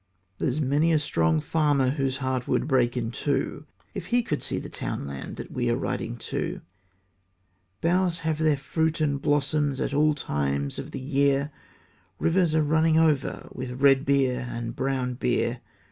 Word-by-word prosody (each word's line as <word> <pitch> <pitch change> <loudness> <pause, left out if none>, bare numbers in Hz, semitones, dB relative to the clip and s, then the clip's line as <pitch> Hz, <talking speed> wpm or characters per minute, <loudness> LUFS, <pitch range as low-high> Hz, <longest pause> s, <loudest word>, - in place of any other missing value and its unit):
There's 130 +4 0
many 150 +3 +2
a 160 - +4
strong 80 - +1
farmer 145 - +2
Whose 135 -2 -1
heart 130 -2 -2
would - - +1
break 125 -3 +2
in 115 -2 -2
two, 140 +3 -2 0.3
If 190 -4 -6
he 240 +4 +2
could 150 -8 -2
see - - -2
the - - -5
townland 70 +3 -5
That - - -8
we - - -1
are - - +2
riding - - -3 0.2
to; - - -2 1.2
Boughs 175 0 +1
have 160 -2 -1
their 155 -2 +3
fruit 160 +3 -1
and 145 -3 0
blossom 145 0 +1
At 135 - -2
all 150 +1 +3
times 70 - -2
of - - -6
the - - -6
year; 140 +1 +1 0.7
Rivers 165 - +2
are 155 - +4
running 160 +1 +3
over 155 -4 +1
With 125 0 -6
red 135 -1 +5
beer 130 -3 +1
and 115 0 -5
brown 130 -3 -1
beer. 120 -1 0
140 Hz, 165 wpm, -26 LUFS, 125-155 Hz, 1.2 s, red